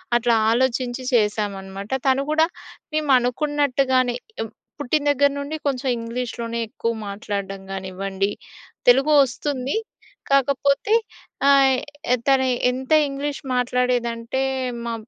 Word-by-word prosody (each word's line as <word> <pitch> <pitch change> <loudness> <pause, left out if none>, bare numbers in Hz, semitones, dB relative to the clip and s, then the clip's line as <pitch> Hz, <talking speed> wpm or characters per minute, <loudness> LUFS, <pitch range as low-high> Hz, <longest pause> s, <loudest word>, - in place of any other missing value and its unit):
అట్లా 240 0 +3 0.2
ఆలోచించి 250 +1 0
చేశామనమాట. 205 -3 -1 0.2
తను 265 +1 +3
కూడా 315 +1 +4 0.5
మేము 305 -2 +1
అనుకున్నట్టుగా‌నే 260 -1 +1 0.3
ఏం 225 - -3 0.3
పుట్టిన 290 +1 0
దగ్గర 285 0 +3
నుండి 285 +2 -4
కొంచెం 270 -1 -1
ఇంగ్లీష్‌లోనే 235 0 -4
ఎక్కువ 230 +2 -2 0.2
మాట్లాడడం 200 -1 -4
కానివ్వండి 195 +1 -3 0.6
తెలుగు 270 +5 +5
వస్తుంది 265 - -3 0.6
కాకపోతే 280 - +2 0.6
ఆహ్, 270 -2 +5 0.5
తను 265 -1 +4 0.2
ఎంత 260 +2 -6 0.2
ఇంగ్లీష్ 280 +1 -4
మాట్లాడేదంటే 245 0 0 0.4
మా 235 - -2
250 Hz, 100 wpm, -22 LUFS, 230-275 Hz, 0.6 s, తెలుగు